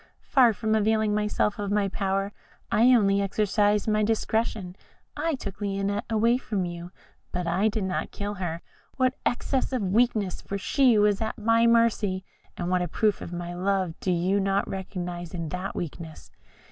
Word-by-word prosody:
Far 255 -4 +5
from 220 +1 -1
availing 220 0 +2
myself 210 0 0
of 205 -1 -2
my 205 -1 +1
power, 195 0 -1 0.4
I 230 +3 +5
only 200 -5 +4
exercised 205 +1 +1
my 215 0 +2
discretion. 220 -3 -1 0.4
I 325 -2 -1
took 200 -5 -8
Lionette 200 0 -1
away 230 +2 +3
from 200 -7 -2
you, 175 0 -6 0.4
but 180 0 -2
I 180 +5 +2
did 215 -1 -1
not 190 -1 -2
kill 205 0 -4
her 170 -1 -3 0.3
what 255 -1 +2
excess 260 +2 -1
of 255 -5 -1
weakness! 220 -5 +1
for 200 - -4
she 250 +3 +3
was 205 0 +3
at 220 +2 -2
my 230 +1 +3
mercy 220 -5 +2 0.3
and 175 0 -2
what 180 -1 +2
a 175 - -1
proof 210 +4 0
of - - -7
my 175 0 -5
love 185 -1 0
do 185 - -1
you 180 +3 +1
not 195 0 +1
recognise 180 -2 -5
in 165 -2 -4
that 180 +4 -4
weakness? 160 -1 -7
200 Hz, 170 wpm, -26 LUFS, 185-220 Hz, 0.4 s, Far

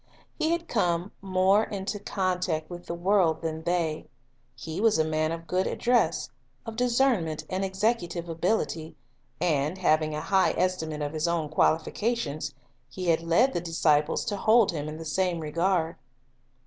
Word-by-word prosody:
He 315 - +1
had 335 0 -1
come 175 -3 0
more 190 +2 +3
into 205 0 -4
contact 180 -5 -2
with 175 0 -8
the 170 - -3
world 175 -3 +2
than 160 -1 -3
they, 165 -2 -1 0.5
he 160 +8 -5
was 225 -4 +4
a 160 - +2
man 155 0 0
of 165 0 -5
good 185 +3 0
address, 245 0 +1 0.3
of 225 -1 -6
discernment 235 - +1
and 185 +1 -1
executive 190 -3 -1
ability, 165 -2 -1 0.4
and, 155 0 0
having 155 -4 +2
a 150 - -3
high 190 +1 +2
estimate 160 -4 -1
of 145 +1 -3
his 155 +1 -1
own 165 -3 -1
qualifications, 160 - 0 0.3
he 180 +4 -3
had 165 0 +3
led 170 +11 +3
the 175 - -1
disciples 155 -3 +1
to 205 - -2
hold 220 +1 +4
him 150 -2 -4
in 155 - -7
the 165 - -8
same 180 +1 0
regard. 165 +2 0
175 Hz, 160 wpm, -27 LUFS, 160-195 Hz, 0.5 s, was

